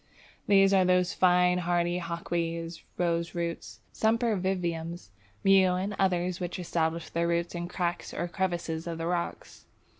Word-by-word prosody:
These 195 Hz, -1 st, +5 dB
are 190 Hz, -1 st, +5 dB
those 180 Hz, 0 st, +2 dB
fine 180 Hz, 0 st, +4 dB
hardy 175 Hz, 0 st, 0 dB
Hawkweeds, 170 Hz, -1 st, -3 dB, 0.2 s
Roseroots, 170 Hz, 0 st, -2 dB
Sempervivums, 185 Hz, -, -1 dB, 0.3 s
Mew, 190 Hz, -2 st, +5 dB
and 195 Hz, +3 st, -2 dB
others 180 Hz, -1 st, +1 dB
which 175 Hz, -1 st, -4 dB
establish 165 Hz, -2 st, -2 dB
their 170 Hz, 0 st, 0 dB
roots 170 Hz, 0 st, 0 dB
in 175 Hz, 0 st, -4 dB
cracks 175 Hz, -1 st, -3 dB
or 175 Hz, -, -3 dB
crevices 175 Hz, -3 st, -2 dB
of 165 Hz, -1 st, -3 dB
the 165 Hz, -, -3 dB
rocks. 175 Hz, 0 st, -4 dB
175 Hz, 130 wpm, -28 LUFS, 170-185 Hz, 0.3 s, These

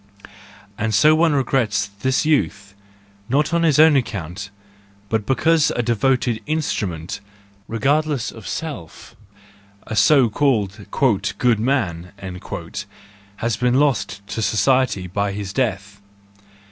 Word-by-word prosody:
And 110 Hz, -1 st, 0 dB
so 155 Hz, +9 st, +6 dB
one 160 Hz, 0 st, +3 dB
regrets 120 Hz, -7 st, +1 dB
this 130 Hz, +5 st, +1 dB
youth, 100 Hz, -, 0 dB, 0.6 s
not 150 Hz, +6 st, +1 dB
on 170 Hz, -, +2 dB
his 160 Hz, -4 st, +3 dB
own 155 Hz, -1 st, +7 dB
account, 100 Hz, -, -3 dB, 0.6 s
but 110 Hz, -1 st, -1 dB
because 160 Hz, +3 st, +3 dB
a 120 Hz, -, 0 dB
devoted 120 Hz, 0 st, +1 dB
instrument, 105 Hz, -, -2 dB, 0.5 s
regardless 140 Hz, +3 st, 0 dB
of 115 Hz, -3 st, -11 dB
self—a 100 Hz, -, -9 dB
so 130 Hz, +5 st, +5 dB
called 105 Hz, -5 st, 0 dB, 0.5 s
"good 120 Hz, -2 st, +2 dB
man," 100 Hz, -9 st, -1 dB, 1.2 s
has 115 Hz, +1 st, -1 dB
been 125 Hz, 0 st, +1 dB
lost 120 Hz, -8 st, 0 dB
to 110 Hz, -, -3 dB
society 110 Hz, -1 st, +2 dB
by 100 Hz, +2 st, -2 dB
his 100 Hz, -1 st, -5 dB
death. 100 Hz, -5 st, -2 dB
115 Hz, 110 wpm, -21 LUFS, 100-135 Hz, 1.2 s, own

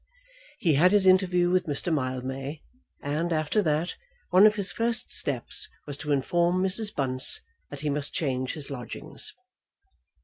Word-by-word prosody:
He 170 Hz, -, +2 dB
had 180 Hz, +7 st, +4 dB
his 205 Hz, -2 st, +4 dB
interview 180 Hz, -2 st, +4 dB
with 185 Hz, -1 st, +1 dB
Mr. 150 Hz, +4 st, -1 dB
Mildmay, 135 Hz, +1 st, -4 dB, 0.4 s
and, 155 Hz, +4 st, -2 dB
after 155 Hz, +6 st, +1 dB
that, 160 Hz, 0 st, -1 dB, 0.3 s
one 190 Hz, +4 st, +7 dB
of 210 Hz, -, +2 dB
his 200 Hz, -2 st, +2 dB
first 235 Hz, 0 st, 0 dB
steps -, -, 0 dB, 0.2 s
was 145 Hz, -, -6 dB
to 150 Hz, 0 st, -4 dB
inform 175 Hz, +6 st, +1 dB
Mrs. 205 Hz, +3 st, +3 dB
Bunce 130 Hz, -2 st, 0 dB, 0.3 s
that 145 Hz, -1 st, -8 dB
he 150 Hz, -, -1 dB
must 145 Hz, 0 st, -3 dB
change 130 Hz, -4 st, -2 dB
his 150 Hz, -2 st, -6 dB
lodgings. 125 Hz, -4 st, -5 dB
155 Hz, 150 wpm, -26 LUFS, 140-185 Hz, 0.4 s, one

